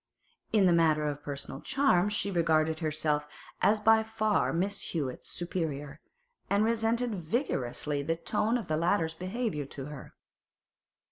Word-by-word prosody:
In 210 Hz, -3 st, +4 dB
the 175 Hz, -, +5 dB
matter 160 Hz, -2 st, +3 dB
of 145 Hz, 0 st, -3 dB
personal 140 Hz, -1 st, -6 dB
charms 210 Hz, -8 st, +2 dB
she 200 Hz, 0 st, 0 dB
regarded 160 Hz, -2 st, +2 dB
herself 155 Hz, -2 st, 0 dB, 0.3 s
as 215 Hz, +1 st, +4 dB
by 225 Hz, +1 st, +5 dB
far 220 Hz, -1 st, +1 dB
Miss 195 Hz, +4 st, -1 dB
Hewett's 140 Hz, -7 st, -4 dB
superior, 155 Hz, -5 st, -4 dB, 0.5 s
and 200 Hz, +1 st, +3 dB
resented 230 Hz, +1 st, +1 dB
vigorously 155 Hz, -, -1 dB
the 165 Hz, +3 st, -1 dB
tone 210 Hz, +7 st, 0 dB
of 225 Hz, -7 st, -6 dB
the 155 Hz, -, 0 dB
latter's 165 Hz, -1 st, +1 dB
behaviour 185 Hz, -, -3 dB
to 135 Hz, 0 st, -8 dB
her. 150 Hz, -2 st, -10 dB
170 Hz, 140 wpm, -30 LUFS, 150-210 Hz, 0.5 s, the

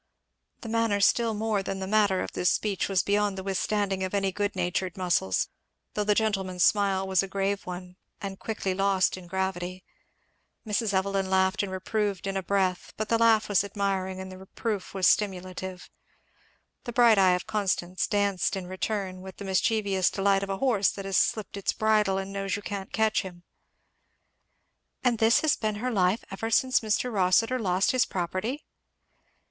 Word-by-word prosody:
The 230 Hz, -, -7 dB
manner 225 Hz, -2 st, +1 dB
still 225 Hz, +3 st, +3 dB
more 215 Hz, -1 st, 0 dB
than 195 Hz, 0 st, -4 dB
the 190 Hz, -, -3 dB
matter 200 Hz, -2 st, +2 dB
of -, -, -4 dB
this 180 Hz, -, +1 dB
speech 205 Hz, -3 st, 0 dB
was 190 Hz, -3 st, +2 dB
beyond 205 Hz, -1 st, +1 dB
the 190 Hz, -, -5 dB
withstanding 195 Hz, 0 st, -1 dB
of 185 Hz, +2 st, -2 dB
any 195 Hz, -1 st, +1 dB
good 205 Hz, +1 st, -2 dB
natured 180 Hz, 0 st, -2 dB
muscles, 175 Hz, -, +1 dB, 0.5 s
though 210 Hz, -, 0 dB
the 210 Hz, 0 st, +2 dB
gentleman's 195 Hz, -5 st, 0 dB
smile 195 Hz, -2 st, +2 dB
was 190 Hz, -1 st, +3 dB
a 195 Hz, -, -4 dB
grave 195 Hz, 0 st, -2 dB
one 180 Hz, 0 st, -7 dB, 0.2 s
and 195 Hz, -1 st, -6 dB
quickly 205 Hz, -4 st, -2 dB
lost 195 Hz, 0 st, +2 dB
in 185 Hz, -2 st, -11 dB
gravity. 185 Hz, 0 st, -3 dB, 0.8 s
Mrs. 215 Hz, 0 st, 0 dB
Evelyn 195 Hz, 0 st, 0 dB
laughed 190 Hz, 0 st, +2 dB
and 200 Hz, -2 st, -4 dB
reproved 195 Hz, +1 st, -2 dB
in 195 Hz, 0 st, -2 dB
a 195 Hz, -, 0 dB
breath; 185 Hz, -1 st, -1 dB
but 215 Hz, 0 st, -3 dB
the 230 Hz, -, +2 dB
laugh 225 Hz, -2 st, +4 dB
was 205 Hz, -1 st, +3 dB
admiring 195 Hz, -2 st, -2 dB
and 190 Hz, 0 st, -7 dB
the 185 Hz, -, -10 dB
reproof 195 Hz, +1 st, -4 dB
was 190 Hz, -1 st, +1 dB
stimulative. 185 Hz, -2 st, -1 dB, 1.0 s
The 240 Hz, -, -5 dB
bright 235 Hz, -4 st, +5 dB
eye 185 Hz, -2 st, +5 dB
of 180 Hz, -, -4 dB
Constance 185 Hz, -3 st, -1 dB
danced 200 Hz, -3 st, +1 dB
in 190 Hz, -2 st, -5 dB
return 185 Hz, 0 st, -3 dB
with 190 Hz, 0 st, -10 dB
the 200 Hz, -, -7 dB
mischievous 195 Hz, 0 st, +1 dB
delight 195 Hz, 0 st, +2 dB
of 200 Hz, -, -4 dB
a 195 Hz, -, -2 dB
horse 235 Hz, -6 st, +2 dB
that 195 Hz, -, -7 dB
has 195 Hz, -1 st, 0 dB
slipped 215 Hz, -2 st, 0 dB
his 200 Hz, -1 st, -1 dB
bridle 215 Hz, -3 st, +2 dB
and 195 Hz, 0 st, -4 dB
knows 195 Hz, -1 st, -2 dB
you 205 Hz, -, -6 dB
can't 200 Hz, -3 st, -5 dB
catch 220 Hz, -1 st, +2 dB
him. 175 Hz, -2 st, -10 dB, 1.6 s
"And 240 Hz, -3 st, +2 dB
this 225 Hz, +1 st, +4 dB
has 315 Hz, 0 st, +3 dB
been 215 Hz, -1 st, -2 dB
her 250 Hz, +5 st, -2 dB
life 190 Hz, 0 st, +1 dB
ever 225 Hz, +4 st, -4 dB
since 255 Hz, +3 st, +3 dB
Mr. 225 Hz, +2 st, -1 dB
Rossitur 210 Hz, +6 st, +2 dB
lost 185 Hz, -3 st, +2 dB
his 255 Hz, -2 st, +3 dB
property?" 185 Hz, -, -3 dB
195 Hz, 180 wpm, -27 LUFS, 190-210 Hz, 1.6 s, bright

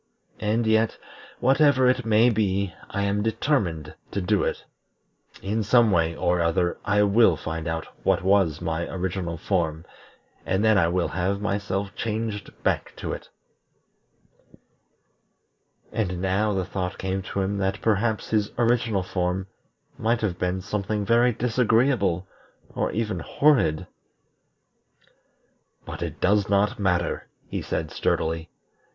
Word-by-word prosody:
And 110 Hz, +2 st, 0 dB
yet, 110 Hz, 0 st, +2 dB, 0.4 s
whatever 135 Hz, 0 st, +4 dB
it 125 Hz, -1 st, +2 dB
may 115 Hz, +3 st, +5 dB
be, 100 Hz, -4 st, 0 dB, 0.2 s
I 100 Hz, -, -2 dB
am 100 Hz, +1 st, 0 dB
determined 105 Hz, -, -1 dB, 0.2 s
to -, -, -3 dB
do 100 Hz, +2 st, +1 dB
it. -, -, -3 dB, 0.8 s
In 105 Hz, +3 st, -1 dB
some 115 Hz, +1 st, +4 dB
way 85 Hz, -2 st, +2 dB
or 90 Hz, 0 st, +1 dB
other 85 Hz, +1 st, +1 dB
I 105 Hz, 0 st, +3 dB
will 100 Hz, -2 st, +5 dB
find 80 Hz, +1 st, -5 dB
out 80 Hz, 0 st, -2 dB, 0.2 s
what -, -, +1 dB
was 95 Hz, -5 st, +2 dB
my 80 Hz, +1 st, -2 dB
original 90 Hz, -2 st, -3 dB
form, 80 Hz, -3 st, -1 dB, 0.6 s
and 95 Hz, +3 st, 0 dB
then 110 Hz, 0 st, +5 dB
I 85 Hz, -4 st, +4 dB
will 90 Hz, +1 st, 0 dB
have 95 Hz, +2 st, -1 dB
myself 100 Hz, -1 st, -2 dB
changed 110 Hz, -2 st, -3 dB
back -, -, 0 dB
to -, -, -4 dB
it." -, -, -8 dB, 2.6 s
And 90 Hz, -5 st, -2 dB
now 95 Hz, +3 st, +1 dB
the 95 Hz, -2 st, -1 dB
thought 90 Hz, -1 st, -4 dB
came 95 Hz, 0 st, -2 dB
to 95 Hz, +1 st, -3 dB
him 100 Hz, +1 st, -1 dB
that 95 Hz, 0 st, -1 dB
perhaps 110 Hz, 0 st, 0 dB
his 105 Hz, -2 st, +1 dB
original 115 Hz, -4 st, +2 dB
form 90 Hz, 0 st, -2 dB, 0.5 s
might 115 Hz, +1 st, +1 dB
have 90 Hz, -5 st, -2 dB
been 90 Hz, +1 st, -1 dB
something 100 Hz, +1 st, -2 dB
very 120 Hz, +3 st, +4 dB
disagreeable, 115 Hz, -5 st, +1 dB, 0.5 s
or -, -, -1 dB
even 110 Hz, -5 st, -2 dB
horrid. 95 Hz, -, +2 dB, 2.0 s
"But -, -, -7 dB
it -, -, -4 dB
does 100 Hz, +1 st, +2 dB
not 100 Hz, +1 st, +2 dB
matter," 90 Hz, -3 st, 0 dB, 0.2 s
he -, -, -4 dB
said -, -, -3 dB
sturdily. 80 Hz, 0 st, -1 dB
100 Hz, 135 wpm, -25 LUFS, 90-110 Hz, 2.6 s, may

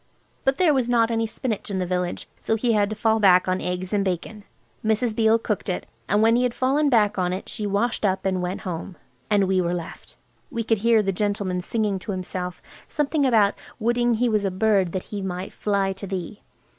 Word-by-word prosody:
But 270 Hz, 0 st, +2 dB
there 335 Hz, -3 st, +4 dB
was 255 Hz, -3 st, +1 dB
not 230 Hz, -1 st, +3 dB
any 225 Hz, 0 st, 0 dB
spinach 220 Hz, -2 st, -4 dB
in 195 Hz, -, -2 dB
the 185 Hz, -, 0 dB
village, 180 Hz, 0 st, -2 dB
so 220 Hz, -, 0 dB
he 230 Hz, +1 st, +1 dB
had 205 Hz, -1 st, +2 dB
to 215 Hz, -, -4 dB
fall 220 Hz, +1 st, +2 dB
back 185 Hz, -3 st, +5 dB
on 185 Hz, 0 st, 0 dB
eggs 180 Hz, +2 st, -3 dB
and 205 Hz, -1 st, +2 dB
bacon. 195 Hz, +3 st, -4 dB, 0.4 s
Mrs. 220 Hz, +1 st, +1 dB
Beale 220 Hz, 0 st, +4 dB
cooked 210 Hz, -3 st, -3 dB
it, 180 Hz, -, -2 dB, 0.2 s
and 205 Hz, +2 st, +3 dB
when 225 Hz, +1 st, +5 dB
he 245 Hz, -, +3 dB
had 250 Hz, -1 st, 0 dB
fallen 280 Hz, +3 st, +2 dB
back 210 Hz, -5 st, +3 dB
on 180 Hz, -1 st, +1 dB
it 190 Hz, -, -5 dB
she 210 Hz, -3 st, -4 dB
washed 205 Hz, +4 st, 0 dB
up 190 Hz, -2 st, 0 dB
and 185 Hz, -1 st, 0 dB
went 180 Hz, +2 st, -3 dB
home. 180 Hz, -1 st, -5 dB, 0.3 s
And 200 Hz, -2 st, +3 dB
we 190 Hz, -1 st, +2 dB
were 175 Hz, 0 st, 0 dB
left. 170 Hz, -2 st, -8 dB, 0.3 s
We 235 Hz, -6 st, -3 dB
could 225 Hz, -1 st, +1 dB
hear 225 Hz, 0 st, +4 dB
the 195 Hz, -, 0 dB
gentleman 200 Hz, -2 st, -1 dB
singing 210 Hz, 0 st, -1 dB
to 200 Hz, +2 st, -5 dB
himself, 180 Hz, -1 st, -5 dB, 0.2 s
something 295 Hz, -1 st, +1 dB
about 215 Hz, -5 st, +4 dB, 0.3 s
woulding 240 Hz, +1 st, +2 dB
he 245 Hz, +2 st, +1 dB
was 215 Hz, -3 st, +1 dB
a 195 Hz, -, +1 dB
bird 190 Hz, -2 st, +2 dB
that 185 Hz, -, -2 dB
he 205 Hz, -, -3 dB
might 185 Hz, 0 st, -5 dB
fly 200 Hz, -2 st, 0 dB
to 195 Hz, +1 st, -8 dB
thee. 190 Hz, +2 st, -5 dB
205 Hz, 220 wpm, -24 LUFS, 185-230 Hz, 0.4 s, back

